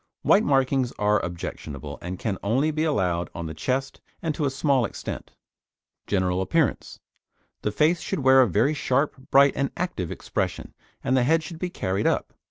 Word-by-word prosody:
White 210 - +5
markings 135 -2 +2
are 105 0 +1
objectionable, 80 -5 -6
and 90 +1 -5
can 100 -2 -3
only 130 +10 +1
be 155 +1 -1
allowed 90 - 0
on 85 - -4
the 80 - -5
chest 130 - -2 0.2
and 160 -2 -2
to 150 - -1
a - - +2
small 135 -1 +2
extent. 110 - -5 0.8
GENERAL 95 -2 +1
APPEARANCE 145 - 0 0.6
The 105 - -1
face 155 +10 +2
should - - -3
wear 130 0 +6
a 125 - +4
very 130 - +2
sharp, 140 -2 -1
bright 140 0 +6
and 140 -1 0
active 170 - -2
expression, - - -3 0.3
and 130 - +1
the 130 - +4
head 160 +6 +3
should 160 +1 -8
be 180 - -2
carried 100 - -1
up. - - 0
130 Hz, 180 wpm, -25 LUFS, 95-150 Hz, 0.8 s, wear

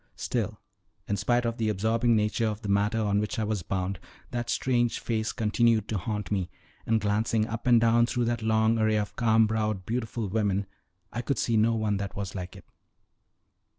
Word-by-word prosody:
Still, - - -2 0.5
in 100 - 0
spite 120 +5 +1
of 115 0 -1
the 110 -1 0
absorbing 115 +3 +2
nature 110 +1 +1
of 105 0 -4
the 100 - -4
matter 100 +3 +2
on 105 -2 +1
which 105 +5 -2
I 110 - 0
was 105 -2 -1
bound, 95 +1 -3 0.3
that 120 -1 -3
strange 120 -2 +1
face 110 -1 -1
continued 115 -1 +2
to 110 - -1
haunt 105 +2 -4
me, 95 -3 -1 0.4
and 115 0 +3
glancing 110 +1 +1
up 115 +2 -5
and 120 -1 +6
down 115 +1 +4
through 120 -1 0
that 120 0 -1
long 110 +1 +2
array 110 0 +2
of 105 -1 -3
calm 110 -1 +4
browed, 110 -3 -1
beautiful 115 -1 -2
women, 100 -1 0 0.5
I 120 - -2
could 135 0 -1
see 115 - +1
no 110 +1 +3
one 110 -2 0
that 100 0 -5
was 100 -2 -4
like 90 0 -6
it. 95 - -13
110 Hz, 195 wpm, -27 LUFS, 105-115 Hz, 0.5 s, and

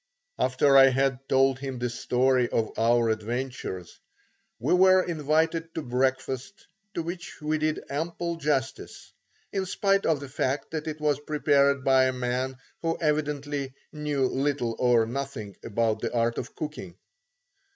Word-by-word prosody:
After 135 +2 +3
I 135 0 +9
had 135 0 +1
told 135 0 +3
him 135 -2 -5
the 120 0 -1
story 125 +1 +1
of 110 -1 0
our 115 0 +3
adventures, 110 -5 -4 0.6
we - - 0
were 185 0 +6
invited 160 0 0
to 160 - -3
breakfast 130 +6 -2 0.3
to 170 - -1
which 175 +1 -7
we 155 +1 -1
did 155 0 -1
ample 170 +3 -3
justice, 140 -4 -3 0.4
in 190 -1 -1
spite 195 +1 +1
of 155 -3 +2
the 140 - -7
fact 135 +1 -2
that 160 -1 -4
it 155 0 -4
was 150 -2 +1
prepared 140 -2 +2
by 130 -1 +5
a 130 - +1
man 125 +1 -2 0.2
who 165 0 -1
evidently 145 -3 -1 0.2
knew 150 -3 0
little 135 -3 -1
or 120 -2 +4
nothing 120 -5 -5
about 110 0 0
the - - -2
art 115 -1 0
of - - -7
cooking. 95 - -6
135 Hz, 150 wpm, -27 LUFS, 125-155 Hz, 0.6 s, I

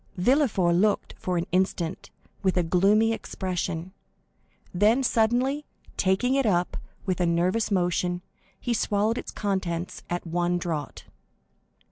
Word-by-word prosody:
Villefort 210 - +3
looked 205 +2 +1
for 180 -1 -1
an 170 - 0
instant 180 -2 -1 0.3
with 190 -2 +1
a 180 - +3
gloomy 200 +6 +3
expression, 185 -4 -4 0.8
then, 215 +8 +3
suddenly, 250 +5 +2 0.3
taking 195 +7 +2
it 270 -3 +2
up 175 -3 +1 0.3
with 185 -1 -1
a 175 - +3
nervous 180 +6 +1
motion, 180 -2 0 0.4
he 240 - -1
swallowed 215 +1 +1
its - - -7
contents 185 -4 -3
at 175 0 -3
one 175 +1 0
draught. 160 -5 -4
185 Hz, 125 wpm, -26 LUFS, 175-220 Hz, 0.8 s, Villefort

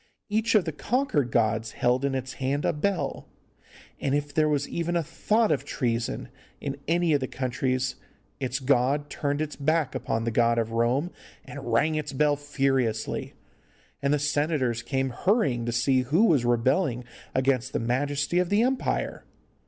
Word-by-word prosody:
Each 220 +2 +1
of 205 - +4
the 160 - -2
conquered 155 - 0
gods 110 -1 +1
held 125 +2 +1
in 140 -1 0
its 130 0 -4
hand 140 +2 0
a - - +2
bell, 190 +5 -2 0.7
and 140 0 0
if 145 0 -2
there 155 0 +3
was 145 -1 0
even 170 +1 -2
a 170 - +1
thought 210 +7 +1
of 145 - +1
treason 115 - -2 0.3
in 140 -1 -4
any 170 0 +2
of 145 - +3
the 130 - -3
countries 130 0 -1 0.4
its 130 -1 -1
god 140 +2 +1
turned 145 0 -1
its 155 -1 -3
back 155 -1 +1
upon 115 - -2
the 115 - -1
god 115 +1 +3
of 115 -1 0
Rome 120 +9 +1 0.3
and 135 -4 -7
rang 150 +8 +3
its 155 -2 -3
bell 145 +2 +3
furiously, 135 -6 -1 0.7
and 140 - +1
the 150 - +3
senators 145 -5 0
came 135 +2 -1
hurrying 135 - +1
to - - 0
see 130 +3 +2
who 155 - +3
was 145 - +3
rebelling 125 +2 +1 0.3
against 130 -1 +1
the - - -1
majesty 145 +7 0
of 180 -1 +1
the 205 +3 +3
empire. 260 +1 -1
140 Hz, 170 wpm, -26 LUFS, 125-155 Hz, 0.7 s, of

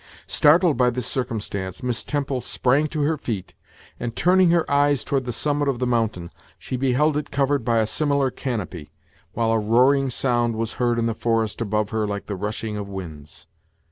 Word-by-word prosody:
Startled 160 +1 +4
by 125 -1 +4
this 125 0 -3
circumstance, 105 -7 -4
Miss 125 -2 -1
Temple 140 -3 -2
sprang 135 +6 +1
to 150 -1 -2
her 155 +2 +1
feet, 110 -9 -5 0.5
and, 120 -1 -4
turning 180 +1 +4
her 170 -1 +3
eyes 145 -1 +2
toward 135 -3 -1
the 125 - -3
summit 145 +4 0
of 135 -3 0
the 125 - -1
mountain, 110 -8 -1 0.3
she - - -5
beheld 135 +4 +2
It 150 - -4
covered 140 -1 0
by 115 0 +1
a 110 - +3
similar 140 +2 +1
canopy, 100 - -5 0.4
while 115 0 0
a 115 - +2
roaring 130 +6 +3
sound 120 -2 0
was 115 0 -3
heard 120 -1 +2
in 115 - 0
the 115 - 0
forest 115 0 -1
above 105 -1 -1
her 110 -1 0
like 100 0 -4
the 100 - -4
rushing 105 +2 -4
of 100 -1 -5
winds. 80 -6 -9
120 Hz, 190 wpm, -23 LUFS, 110-140 Hz, 0.5 s, Startled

